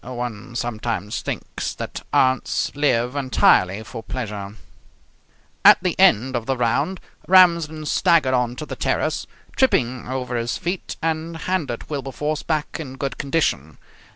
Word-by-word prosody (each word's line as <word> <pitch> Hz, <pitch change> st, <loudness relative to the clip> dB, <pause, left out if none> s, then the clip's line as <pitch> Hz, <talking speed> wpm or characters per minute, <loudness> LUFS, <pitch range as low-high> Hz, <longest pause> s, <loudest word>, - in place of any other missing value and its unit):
One 120 Hz, -1 st, -6 dB
sometimes 110 Hz, -3 st, -3 dB
thinks -, -, -4 dB
that -, -, -6 dB
aunts 130 Hz, -1 st, +2 dB
live 125 Hz, -3 st, +1 dB
entirely 110 Hz, -7 st, +3 dB
for 115 Hz, +1 st, -8 dB
pleasure. 105 Hz, -5 st, -5 dB, 1.1 s
At -, -, +9 dB
the -, -, 0 dB
end 130 Hz, +5 st, +4 dB
of 120 Hz, -1 st, -3 dB
the 135 Hz, -1 st, 0 dB
round 140 Hz, +10 st, 0 dB, 0.3 s
Ramsden 170 Hz, -4 st, +4 dB
staggered 160 Hz, -5 st, +3 dB
on 125 Hz, -1 st, +1 dB
to 155 Hz, -, -6 dB
the -, -, -6 dB
terrace, -, -, -1 dB, 0.3 s
tripping 130 Hz, -, +1 dB
over 125 Hz, -1 st, -3 dB
his 120 Hz, 0 st, -2 dB
feet, 175 Hz, +2 st, -4 dB
and 165 Hz, 0 st, -2 dB
handed 155 Hz, -8 st, -3 dB
Wilberforce 145 Hz, +1 st, -3 dB
back 155 Hz, -2 st, -2 dB
in 135 Hz, -5 st, -7 dB
good 135 Hz, 0 st, -4 dB
condition. 110 Hz, -, -1 dB
130 Hz, 135 wpm, -22 LUFS, 120-155 Hz, 1.1 s, At